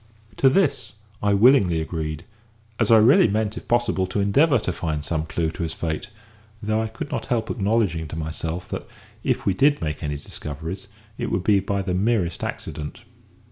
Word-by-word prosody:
To 135 - +5
this 130 - +1 0.3
I 100 -1 +3
willingly 100 -7 +5
agreed, 80 -1 -4 0.6
as 110 - +2
I 115 - +8
really 115 +3 +6
meant, 110 +1 -1
it - - -8
possible, 120 -6 +1
to 95 +3 -2
endeavour 130 +9 +4
to 95 -5 -2
find 75 -3 -3
some 80 -1 -2
clue 80 -1 -1
to 85 - -7
his 80 - -2
fate; 80 +7 -3 0.5
though 110 0 0
I 110 - -1
could 110 0 -7
not 115 - -3
help 115 -3 0
acknowledging 100 -6 0
to 75 - -7
myself 80 +2 -4
that, - - -5 0.4
if - - 0
we 95 - +3
did 145 +7 +3
make 75 -2 -3
any 75 -1 -2
discoveries, 80 +6 -7 0.3
it - - -2
would 90 - -1
be 100 -1 +4
by 100 +1 -2
the 90 -1 -2
merest 95 -3 0
accident. 75 -1 -5
100 Hz, 185 wpm, -23 LUFS, 80-110 Hz, 0.6 s, I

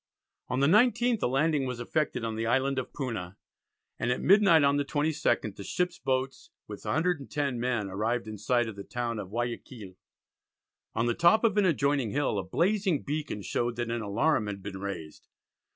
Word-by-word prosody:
On 130 +1 -1
the - - +5
19th 235 - +3
a - - +2
landing 140 +1 +1
was 125 -2 -4
effected 135 0 -1
on 115 -1 -2
the 115 +1 -2
Island 130 +2 +1
of 130 - -6
Puna, 105 -9 -5 0.6
and 120 - 0
at 125 - 0
midnight 195 -6 +5
on 140 0 +3
the 145 - +1
22nd, 145 -8 0
the 100 - -8
ships' 180 - -2
boats 130 0 -2 0.2
with 105 -1 -8
110 150 -6 -1
men 120 -4 -1
arrived 110 +5 -2
in 110 -1 -7
sight 120 +2 +1
of 110 - -6
the 100 - -7
town 120 -1 -3
of 95 - -6
Guiaquil. 115 -2 -5 1.0
On 115 - +1
the 120 - +2
top 170 - +4
of 220 -4 +3
an 205 -2 +3
adjoining 140 -7 +1
hill 135 -5 0
a - - -3
blazing 185 - +1
beacon 145 -8 -4
showed 120 +3 -1
that 120 0 -3
an 120 0 -2
alarum 110 +3 +1
had 100 -2 -6
been 95 -1 -6
raised. 95 -6 -7
125 Hz, 185 wpm, -29 LUFS, 110-155 Hz, 1.0 s, the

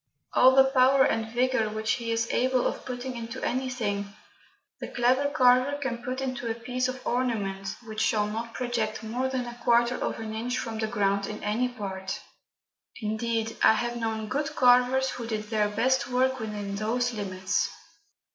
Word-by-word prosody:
All 260 +1 +6
the 270 - +8
power 265 0 +4
and 225 -1 0
vigour 245 -2 +1
which 220 +1 -2
he 235 -2 -2
is 230 0 +1
capable 255 +2 +1
of - - -2
putting 250 0 -5
into 230 -1 -6
anything, 225 -6 -2 0.7
the - - -5
clever 255 +3 +2
carver 255 +1 +4
can 265 -5 -3
put 255 +2 -4
into 255 -3 -3
a 225 - -1
piece 250 +2 -2
of 255 0 -6
ornament 205 -6 -1
which 215 -1 -4
shall 210 -1 +2
not 225 +2 -5
project 230 -3 -2
more 245 +4 -1
than 260 -2 -2
a 240 0 -9
quarter 235 0 +4
of - - -2
an 220 -1 -5
inch 240 +3 -2
from 225 -1 -4
the 220 - 0
ground 200 -3 0
in 210 - -7
any 230 +4 0
part. 195 -5 -5 0.8
Indeed, 225 0 -2
I - - +7
have 240 +2 -2
known 220 -2 -2
good 290 +6 -2
carvers 250 +1 +4
who 235 -2 -6
did 215 -1 -4
their 210 -2 +2
best 250 +5 +1
work 260 +1 +1
within 205 -2 -4
those 240 +4 0
limits. 190 -3 -1
235 Hz, 175 wpm, -27 LUFS, 215-255 Hz, 0.8 s, the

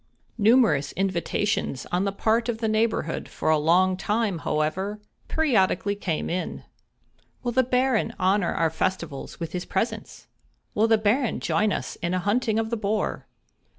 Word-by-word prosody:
Numerous 210 - +4
invitations 190 -5 -1
on 180 +2 +1
the 200 - 0
part 225 +4 +1
of 230 - -1
the 225 0 -1
neighborhood 215 -6 0
for - - 0
a 155 - +4
long 180 +4 +3
time, 205 -1 -1
however, 170 +8 -1 0.3
periodically 205 - +2
came 185 -6 -2
in. 180 +2 -3 0.8
"Will 240 - -1
the 260 +2 +4
Baron 255 -2 +1
honor 190 0 +2
our 165 -1 +1
festivals 170 -4 -3
with 165 -2 -4
his 180 0 -3
presence?" 210 +5 -3 0.5
"Will 220 +2 +3
the 225 -1 +5
Baron 220 +4 +1
join 210 0 +1
us - - -3
in 170 +2 -2
a - - +1
hunting 220 +3 +1
of 225 0 -1
the 235 - 0
boar?" 210 0 -2
205 Hz, 155 wpm, -25 LUFS, 180-225 Hz, 0.8 s, the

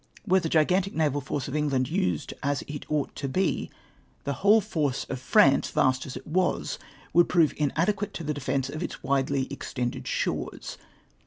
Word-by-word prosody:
Were 190 -2 +4
the 165 -3 -3
gigantic 180 +6 +2
naval 145 -3 +1
force 140 0 -3
of 140 - -4
England 140 -4 +1
used 90 -9 -1
as 140 0 -1
it 145 -1 -8
ought 150 -2 -1
to 140 - -3
be, 185 +7 0 0.5
the 140 - -1
ivhole 205 - +5
force 145 -7 -1
of 130 - -3
France, 135 +2 +4
vast 130 +1 +1
as 130 - -7
it - - -9
ivas, 180 +3 0 0.3
would 175 0 +5
prove 165 -4 +4
inadequate 195 +8 0
to 170 - -5
the 150 0 -1
defence 135 -1 -1
of 155 +3 -6
its - - -3
vjidely 135 0 0
extended 125 -3 -4
sJtores. - - -3
145 Hz, 175 wpm, -27 LUFS, 135-170 Hz, 0.5 s, ivhole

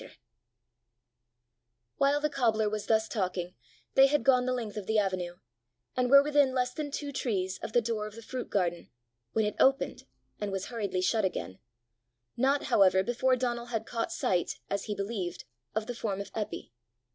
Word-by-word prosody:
'" 120 0 -54
While 280 +1 +4
the 300 - +1
cobbler 225 -6 +2
was 210 0 -3
thus 220 -1 +3
talking, 180 -4 -2 0.4
they 270 0 +7
had 290 -2 +1
gone 255 -1 +4
the - - +1
length 235 -5 -3
of 210 -3 -5
the 220 - +2
avenue, 185 -4 0 0.6
and 250 -1 +1
were 280 +1 +8
within 285 -3 +3
less 250 0 0
than 300 -2 -4
two 285 0 -4
trees 190 -8 -2
of 220 - -6
the 240 - +4
door 220 -2 -2
of 215 - -11
the 230 - -10
fruit 255 +2 -5
garden, 175 -3 -1 0.4
when 220 - +2
it 210 - -1
opened, 270 +1 +2 0.3
and 205 -1 -3
was 195 0 -3
hurriedly 200 -6 -2
shut 215 +3 +2
again 95 - -3 0.8
not, 275 +3 +2
however, 190 -1 +4
before 250 +3 +2
Donal 240 -1 -2
had 225 -2 -3
caught 230 -1 -3
sight, 180 -2 0
as 200 0 -1
he 210 - -3
believed, 195 -4 -4 0.3
of 220 0 0
the 245 - -4
form 210 -4 -3
of 200 - -7
Eppy. 215 - -4
220 Hz, 180 wpm, -30 LUFS, 190-250 Hz, 0.8 s, were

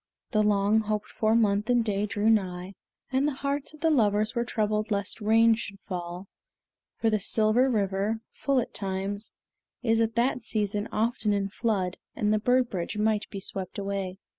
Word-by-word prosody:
The 215 -3 +3
long 210 +1 +3
hoped 215 -1 -2
for 220 0 +1
month 210 -1 +2
and 240 -2 +3
day 205 -1 0
drew 210 0 -1
nigh, 190 -4 +1 0.4
and 265 +2 +2
the 295 - -1
hearts 280 +2 -2
of 300 - -19
the 325 0 +3
lovers 215 -5 +2
were 235 -2 0
troubled 215 -2 -1
lest 200 +1 -2
rain 225 +2 +5
should 210 -3 -5
fall; 180 0 -6 0.7
for 225 - +1
the 215 - +2
Silver 220 +6 +3
River, 205 0 0
full 275 -2 +1
at 240 - -2
all - - -40
times, 195 +1 -2 0.5
is 225 -1 +3
at 225 0 0
that 245 +2 +1
season 210 -1 -1
often 220 -1 0
in 200 -1 0
flood, 190 -4 -1 0.2
and 210 0 +1
the 215 - +2
bird 250 +3 +3
bridge 185 +2 -3
might 215 0 +1
be 195 - -6
swept 190 -1 -4
away. 195 -2 -3
215 Hz, 185 wpm, -27 LUFS, 200-230 Hz, 0.7 s, rain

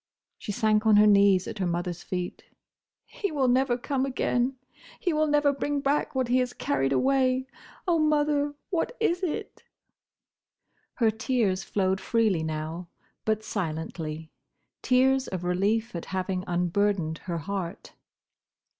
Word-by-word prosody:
she - - -5
sank 215 +1 +2
on 215 - +6
her 210 +1 +7
knees 200 -2 +5
at 215 - -6
her 185 - 0
mother's 175 0 -2
feet. 180 -1 -4 0.6
"He 460 -6 -4
will 275 -4 +1
never 250 0 +2
come 265 +1 -1
again! 255 -1 0 0.4
He 355 - 0
will 310 0 +2
never 295 -1 +3
bring 285 +1 -1
back 280 0 0
what 260 -2 +1
he 250 +2 +3
has 250 -1 -1
carried 135 -1 0
away!—Oh, 265 - 0
mother, 295 -1 +2 0.2
what 380 +8 -1
is 360 -5 +1
it?" 360 -5 -4 1.3
Her 225 -3 +3
tears 220 -4 0
flowed 190 -1 0
freely 220 -7 +1
now, 160 +2 -4 0.4
but 220 0 0
silently: 160 -4 -4 0.5
tears 260 +1 +3
of 185 -2 -4
relief 200 +5 0
at 170 - -4
having 185 -1 -2
unburdened 175 -1 0
her 175 -2 -2
heart. 180 +1 -5
215 Hz, 135 wpm, -27 LUFS, 180-270 Hz, 1.3 s, her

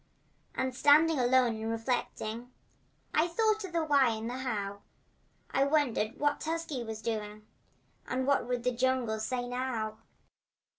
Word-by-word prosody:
And 260 0 -1
standing 300 +2 +5
alone 245 -2 +3
and 220 +1 -3
reflecting 230 0 -3 0.6
I 315 +3 +3
thought 435 +4 +1
of 380 - -6
the 335 -2 0
why 275 -6 +4
and 220 +1 -5
the 250 +2 -4
how, 205 -6 -3 0.7
And 270 - +3
I - - 0
wondered 250 -7 +1
what 290 0 +1
Tusky 320 -5 -3
was 220 -1 -7
doing 215 -2 -4 0.6
And 255 0 -1
what 280 -3 +2
would 245 -1 -2
the 250 - +2
jungle 245 -3 0
say, 245 +3 -2
now. 245 -4 -3
250 Hz, 150 wpm, -31 LUFS, 225-285 Hz, 0.7 s, standing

